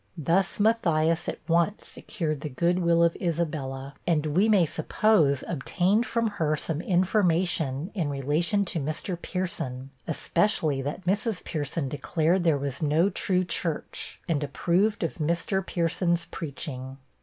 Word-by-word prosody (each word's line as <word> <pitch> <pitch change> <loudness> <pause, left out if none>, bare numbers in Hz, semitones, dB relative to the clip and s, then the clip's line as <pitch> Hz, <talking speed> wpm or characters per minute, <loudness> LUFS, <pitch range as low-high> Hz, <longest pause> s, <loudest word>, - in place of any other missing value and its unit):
Thus 170 +6 +1
Matthias 170 -7 +2
at - - -4
once 170 +4 +1
secured 155 -6 -3
the 150 - -4
good 170 +6 +1
will 170 -1 +3
of 170 0 +3
Isabella, 150 -6 -2
and 160 -3 +2
we 205 +5 +4
may 200 -5 +5
supposed 155 -3 +2
obtained 190 - +1
from 230 -1 0
her 160 -7 0
some 160 +1 -3
information 175 -5 +1
in 170 -8 -1
relation 150 +9 +1
to 170 - -2
Mr. 155 +5 -3
Pierson, 140 -8 -4 0.2
especially 160 -3 +1
that 145 +7 -5
Mrs. 205 +2 0
Pierson 145 -1 -3
declared 160 +5 +1
there 160 -4 +3
was 140 0 -3
no 160 +6 +3
true 185 0 +1
church, 170 -3 -3
and 150 -3 0
approved 175 +10 +1
of 165 - -3
Mr. 170 +5 0
Pierson's 170 0 0
preaching. 135 -3 -6
170 Hz, 140 wpm, -27 LUFS, 150-185 Hz, 0.2 s, may